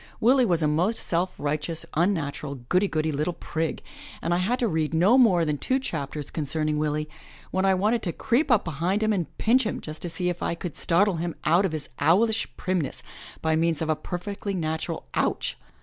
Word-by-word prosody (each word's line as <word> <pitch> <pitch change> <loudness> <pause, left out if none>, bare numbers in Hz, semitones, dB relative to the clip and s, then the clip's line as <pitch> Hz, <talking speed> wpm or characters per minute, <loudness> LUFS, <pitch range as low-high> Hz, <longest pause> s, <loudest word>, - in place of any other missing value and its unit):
Willie 250 +2 +4
was 170 -4 +2
a - - +3
most 175 +9 +1
self 180 +2 -1
righteous, 150 +3 -2
unnatural, 150 -5 0
goody 185 +3 +3
goody 155 -3 0
little 150 +4 -1
prig, 160 -1 -3 0.4
and 170 - -1
I 175 - +2
had 230 +8 0
read 160 -7 0
no 185 +9 +5
more 200 -10 +5
than 150 -2 -1
two 260 - +1
chapters 150 - -4
concerning 155 0 -1
Willie, 150 0 -1 0.4
when 190 +1 +1
I 190 -1 +4
wanted 215 +5 +1
to 175 - -2
creep 255 - +1
up 240 -5 +4
behind 175 +6 0
him 215 0 +2
and 180 -5 -3
pinch 250 +4 +3
him 215 - -2
just 155 0 -8
to 175 - -3
see 175 +2 -2
if 175 -1 -2
I - - -1
could 170 -2 -6
startle 185 +2 +2
him 170 0 -3
out 175 +4 +4
of - - -6
his 155 -2 -4
owlish 215 +9 +3
primness 180 -6 -2 0.4
by 160 0 +2
means 165 -1 +1
of 160 - -2
a - - +2
perfectly 195 +5 -4
natural 160 -2 -3
Ouch!'' - - 0
170 Hz, 200 wpm, -26 LUFS, 155-200 Hz, 0.4 s, no